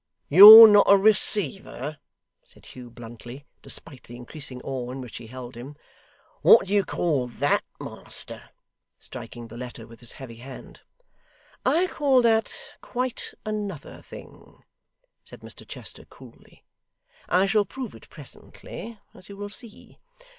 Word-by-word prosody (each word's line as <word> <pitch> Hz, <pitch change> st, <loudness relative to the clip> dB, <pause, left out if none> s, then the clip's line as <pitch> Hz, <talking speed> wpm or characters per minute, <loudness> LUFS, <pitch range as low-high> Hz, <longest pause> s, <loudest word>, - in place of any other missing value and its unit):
'You're 215 Hz, +7 st, +12 dB
not 205 Hz, -1 st, +5 dB
a 200 Hz, -, +7 dB
receiver!' 195 Hz, -, -1 dB, 0.4 s
said -, -, -20 dB
Hugh 125 Hz, -1 st, -12 dB
bluntly, 120 Hz, +3 st, -12 dB, 0.2 s
despite 135 Hz, -6 st, -7 dB
the 120 Hz, -, -12 dB
increasing 125 Hz, +1 st, -8 dB
awe 130 Hz, -2 st, -5 dB
in 130 Hz, +2 st, -7 dB
which 125 Hz, -2 st, -9 dB
he 115 Hz, -, -11 dB
held 125 Hz, +1 st, -10 dB
him. 130 Hz, +5 st, -11 dB, 0.7 s
'What 225 Hz, -, +6 dB
do 195 Hz, -, -5 dB
you 205 Hz, -1 st, +3 dB
call 150 Hz, -7 st, -2 dB
THAT, 140 Hz, +4 st, -1 dB, 0.2 s
master?' -, -, -8 dB, 0.5 s
striking 120 Hz, -1 st, -10 dB
the 115 Hz, -, -12 dB
letter 120 Hz, -2 st, -9 dB
with 115 Hz, 0 st, -16 dB
his 120 Hz, -, -7 dB
heavy 120 Hz, -4 st, -11 dB
hand. 130 Hz, +2 st, -13 dB, 0.9 s
'I 345 Hz, +4 st, +2 dB
call 270 Hz, -4 st, +2 dB
that 225 Hz, -1 st, +1 dB, 0.3 s
quite 250 Hz, 0 st, -5 dB
another 205 Hz, -7 st, -6 dB
thing,' -, -, -15 dB, 0.6 s
said -, -, -13 dB
Mr -, -, -12 dB
Chester -, -, -9 dB
coolly. -, -, -19 dB, 0.6 s
'I 185 Hz, +2 st, +2 dB
shall 205 Hz, +1 st, +1 dB
prove 255 Hz, +5 st, -8 dB
it -, -, -16 dB
presently, 230 Hz, -1 st, -12 dB, 0.2 s
as 185 Hz, -, -17 dB
you 200 Hz, -, -11 dB
will 205 Hz, 0 st, -7 dB
see. 210 Hz, +1 st, -11 dB
150 Hz, 140 wpm, -24 LUFS, 125-210 Hz, 0.9 s, You're